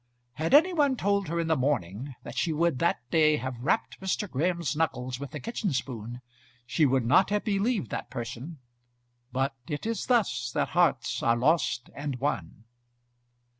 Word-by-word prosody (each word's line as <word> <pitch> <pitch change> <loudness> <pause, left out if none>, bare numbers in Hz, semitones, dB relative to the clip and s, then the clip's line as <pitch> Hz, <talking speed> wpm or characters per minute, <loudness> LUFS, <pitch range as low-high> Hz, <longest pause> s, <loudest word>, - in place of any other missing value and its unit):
Had 160 - +2
any 345 +5 +6
one 285 -5 +3
told 200 -2 +1
her 170 +2 -1
in 165 - 0
the 160 0 +2
morning 130 - -1
that - - -8
she 170 - 0
would 160 -3 +1
that 170 -7 0
day 155 -2 +4
have 130 0 -5
rapped 130 -2 0
Mr. 190 +2 -1
Graham's 170 0 -1
knuckles 130 -5 -1
with 140 -1 -6
a - - -3
kitchen 225 -6 -2
spoon, 120 -1 -4 0.4
she 150 +4 +2
would 130 -2 +1
not 185 +12 +5
have 210 0 0
believed 205 - 0
that - - -4
person; 125 +6 -6 0.7
but 135 +2 0
it 145 +4 -4
is 230 0 -2
thus 220 - +2
that - - +1
hearts 160 -8 +1
are 115 0 +3
lost 130 -2 +1
and 140 -1 -4
won. 115 - -3
150 Hz, 170 wpm, -28 LUFS, 125-180 Hz, 0.7 s, any